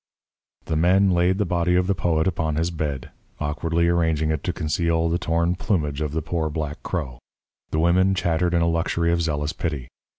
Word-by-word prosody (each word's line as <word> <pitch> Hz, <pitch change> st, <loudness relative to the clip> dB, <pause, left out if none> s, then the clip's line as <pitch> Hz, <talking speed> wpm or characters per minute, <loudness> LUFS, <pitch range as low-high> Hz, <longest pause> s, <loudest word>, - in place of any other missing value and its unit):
The 80 Hz, -, -2 dB
men 95 Hz, +4 st, +4 dB
laid 90 Hz, +1 st, +2 dB
the 105 Hz, -, +1 dB
body 85 Hz, 0 st, +1 dB
of 90 Hz, 0 st, +3 dB
the 100 Hz, -, +1 dB
poet 80 Hz, -4 st, 0 dB
upon 80 Hz, -4 st, -1 dB
his 85 Hz, +2 st, 0 dB
bed, 75 Hz, -5 st, -4 dB, 0.3 s
awkwardly 80 Hz, +3 st, 0 dB
arranging 80 Hz, -2 st, +1 dB
it 80 Hz, -2 st, -2 dB
to -, -, +1 dB
conceal 80 Hz, +1 st, 0 dB
the 85 Hz, +1 st, 0 dB
torn 85 Hz, +1 st, +1 dB
plumage 80 Hz, -7 st, -1 dB
of 75 Hz, -2 st, -2 dB
the 80 Hz, +1 st, -2 dB
poor 80 Hz, -1 st, -1 dB
black 75 Hz, 0 st, -4 dB
crow. 65 Hz, -9 st, -4 dB, 0.5 s
The -, -, -2 dB
women 95 Hz, +3 st, +3 dB
chattered 85 Hz, -1 st, +1 dB
in 85 Hz, -, +3 dB
a -, -, +2 dB
luxury 85 Hz, 0 st, 0 dB
of 85 Hz, 0 st, +1 dB
zealous 75 Hz, -1 st, -1 dB
pity. 75 Hz, -7 st, -4 dB
85 Hz, 195 wpm, -23 LUFS, 80-85 Hz, 0.5 s, men